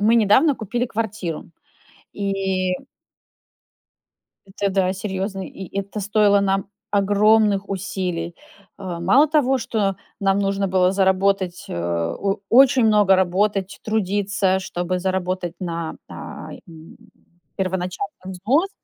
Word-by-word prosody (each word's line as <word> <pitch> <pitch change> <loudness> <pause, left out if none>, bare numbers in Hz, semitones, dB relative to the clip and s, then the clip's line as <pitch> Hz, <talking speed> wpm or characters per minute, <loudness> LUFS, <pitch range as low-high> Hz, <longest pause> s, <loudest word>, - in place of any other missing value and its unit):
мы 215 +3 +4
недавно 230 +8 +4
купили 235 +3 -2
квартиру, 210 -8 -4 0.7
и 195 -2 -1 1.7
Это, 200 +1 -2
да, 190 -1 +1
серьезный. 190 0 -4
И 190 0 -8
это 200 +2 -5
стоило 205 0 +3
нам 195 0 0 0.2
огромных 205 0 +3
усилий. 180 -3 -3 0.4
А, 185 -4 -5
мало 255 - +5
того, 280 -3 +2
что 210 -5 -1 0.2
нам 195 0 +2
нужно 195 0 0
было 185 -1 +3
заработать, 190 -1 +1
э, - - -4
о 85 - -1
очень 260 -1 +6
много 210 -3 +5
работать, 190 +1 0
трудиться, 200 -2 0
чтобы 180 -1 -3
заработать 185 -1 -2
на, 170 -3 -4
а, - - -8 0.2
и 160 -1 -13 0.6
первоначальным 190 - -3
взнос 255 - +1
195 Hz, 110 wpm, -22 LUFS, 185-210 Hz, 1.7 s, очень